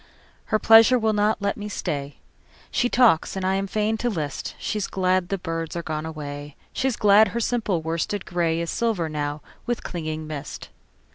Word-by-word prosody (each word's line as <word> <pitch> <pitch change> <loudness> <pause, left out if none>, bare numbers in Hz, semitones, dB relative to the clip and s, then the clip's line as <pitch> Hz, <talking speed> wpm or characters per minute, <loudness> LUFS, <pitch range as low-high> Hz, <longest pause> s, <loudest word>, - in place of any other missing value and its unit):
Her 215 - +1
pleasure 225 +3 +7
will 220 -2 +1
not 210 0 +1
let 200 - 0
me 210 0 -5
stay. 145 -7 -4 0.6
She 245 - +1
talks 235 -12 +4
and 190 -1 -2
I 190 - +2
am 195 +1 -1
fain 215 +2 0
to 245 - -1
list:She's 180 - -3
glad 185 -1 +1
the 195 - 0
birds 165 -2 -4
are 170 - -3
gone 155 0 -3
away, 145 -2 -7 0.2
She's 260 -3 0
glad 210 +1 +6
her 235 - -3
simple 215 -8 0
worsted 165 +5 -2
grayIs 170 -1 0
silver 220 -8 0
now 145 -1 -3 0.2
with 240 -1 -2
clinging 155 -3 -4
mist. 150 -2 -7
185 Hz, 170 wpm, -24 LUFS, 160-215 Hz, 0.6 s, pleasure